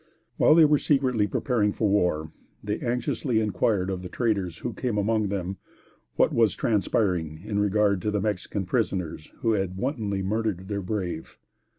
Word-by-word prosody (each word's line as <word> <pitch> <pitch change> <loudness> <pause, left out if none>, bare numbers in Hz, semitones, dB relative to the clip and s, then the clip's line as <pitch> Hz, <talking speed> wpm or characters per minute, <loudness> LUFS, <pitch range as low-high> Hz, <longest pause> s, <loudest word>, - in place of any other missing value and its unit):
While 155 - +6
they 165 -1 +8
were 150 -1 +4
secretly 130 -7 +2
preparing 105 0 0
for 110 - 0
war, 90 -6 +1 0.3
they 105 +1 -2
anxiously 120 0 -1
inquired 105 -3 +1
of 90 -1 -3
the 90 - -7
traders 100 -8 -1
who 120 - -4
came 120 -5 -2
among 110 +1 +1
them, 95 -1 -3 0.6
what - - +3
was 115 -5 +3
transpiring 90 -7 0
in 105 -1 -1
regard 105 -1 +2
to 105 - -1
the 105 0 0
Mexican 100 -1 -2
prisoners 90 -7 -2
who 115 - +2
had 95 -3 -1
wantonly 105 -6 -2
murdered 100 -2 -2
their 100 -1 -2
brave. 90 -4 -4
105 Hz, 165 wpm, -26 LUFS, 95-115 Hz, 0.6 s, they